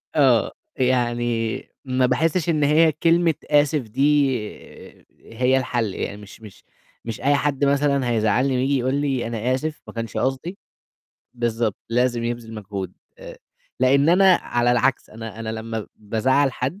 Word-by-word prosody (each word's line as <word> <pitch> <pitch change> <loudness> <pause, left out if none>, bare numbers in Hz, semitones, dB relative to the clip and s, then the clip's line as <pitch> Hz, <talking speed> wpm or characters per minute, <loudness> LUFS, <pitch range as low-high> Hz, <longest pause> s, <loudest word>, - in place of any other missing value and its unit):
آه، - - +4 0.3
يعني 120 -3 0 0.3
ما 130 -1 +1
باحسّش 165 +5 +1
إن 155 -3 +1
هي 155 +3 +4
كلمة 165 +2 +2 0.2
آسف 145 -1 +3
دي 135 +4 +2 1.0
هي 125 +3 +2
الحَل، 120 -6 -1
يعني 100 - -4
مش 105 +1 -13
مش 105 -3 -14 0.4
مش 115 0 -6
أي 145 +2 +3
حد 140 0 0
مثلًا 140 -2 +1
هيزعّلني 115 +4 +1
وييجي 135 +2 +1
يقول 130 +2 -1
لي 135 -4 -1
أنا 115 +2 -1
آسف 155 +3 -5
ما - - -10
كانش 115 -2 -5
قصدي 135 +9 -2 0.8
بالضبط، 115 -3 -1
لازم 120 0 0
يبذِل 120 -1 -4
مجهود، 100 -3 -6 0.3
آآ - - -10 0.4
لإن 140 +3 +4
أنا 185 +1 +6
على 120 -5 0
العكس، 125 +2 +1
أنا 115 0 -8
أنا 110 - -5
لمّا 110 0 -5
بازعّل 130 +6 +1
حد 135 +12 -4
130 Hz, 145 wpm, -22 LUFS, 115-145 Hz, 1.0 s, أنا